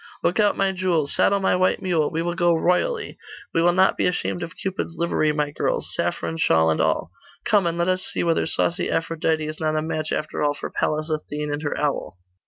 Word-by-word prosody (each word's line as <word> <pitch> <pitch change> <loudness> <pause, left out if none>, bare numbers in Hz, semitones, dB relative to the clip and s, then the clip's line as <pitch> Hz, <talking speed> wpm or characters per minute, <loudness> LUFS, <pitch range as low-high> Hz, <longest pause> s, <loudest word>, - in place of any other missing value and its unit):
Lookout 205 +3 +2
my 195 -1 +2
jewels! 175 -6 +1
Saddle 200 - +3
my 190 - +2
white 185 0 +2
mule! 165 -5 +1
We 165 +1 -2
will 175 0 -1
go 175 -1 +2
royally. 310 - 0 0.3
We 165 - +2
will 175 +1 +5
not 185 +2 +3
be - - +2
ashamed 180 0 -2
of 170 0 -7
Cupid's 190 -3 -4
livery, 160 -2 +1
my 150 -1 -1
girls - - -2
saffron 80 -1 -2
shawl 80 0 +3
and 80 - +1
all! - - 0 0.3
Come, 205 -5 +3
and 170 0 -2
let 170 +1 +1
us 185 0 0
see - - -2
whether 165 -1 +1
saucy 170 +2 0
Aphrodite 165 -1 0
is 155 0 -6
not 155 -1 0
a 155 - +1
match 155 -1 -3
after 155 - -3
all 145 -1 +1
for - - -6
Pallas 155 +1 -1
Athene 150 -1 -3
and 145 - -3
her 145 - -3
owl! 145 -9 -2
165 Hz, 215 wpm, -23 LUFS, 150-180 Hz, 0.3 s, will